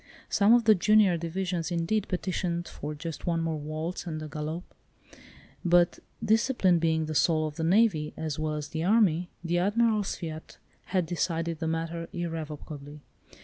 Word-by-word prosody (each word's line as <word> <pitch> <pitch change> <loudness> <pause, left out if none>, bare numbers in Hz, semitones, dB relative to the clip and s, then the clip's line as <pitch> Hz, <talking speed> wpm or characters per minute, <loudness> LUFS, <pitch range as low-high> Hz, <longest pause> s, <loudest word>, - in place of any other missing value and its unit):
Some 210 +3 +5
of 240 - +3
the 220 -1 +7
junior 210 -1 +4
division 175 +1 -2
indeed 175 +5 0
petitioned 175 -2 -2
for 150 +1 -6
just 165 +2 -7
one 170 -1 +1
more 165 -2 -1
waltz 155 +5 -4
and 155 -2 -3
a - - -5
galop; 155 +3 -4 1.0
but 175 -1 +4 0.3
discipline 220 -5 +3
being 160 -1 +1
the 155 - -4
soul 155 0 +3
of 150 -1 -5
the 160 - -3
navy, 175 -4 +3
as 155 -2 -3
well 155 0 -1
as 150 -1 -5
the 160 0 -3
army, 180 -4 +3
the 175 +1 +1
Admiral's 210 +2 +2
fiat 160 -2 -7 0.3
had 185 -2 0
decided 165 -1 -2
the 165 - -2
matter 165 +1 -3
irrevocably. 150 -3 -6
170 Hz, 160 wpm, -28 LUFS, 155-185 Hz, 1.0 s, the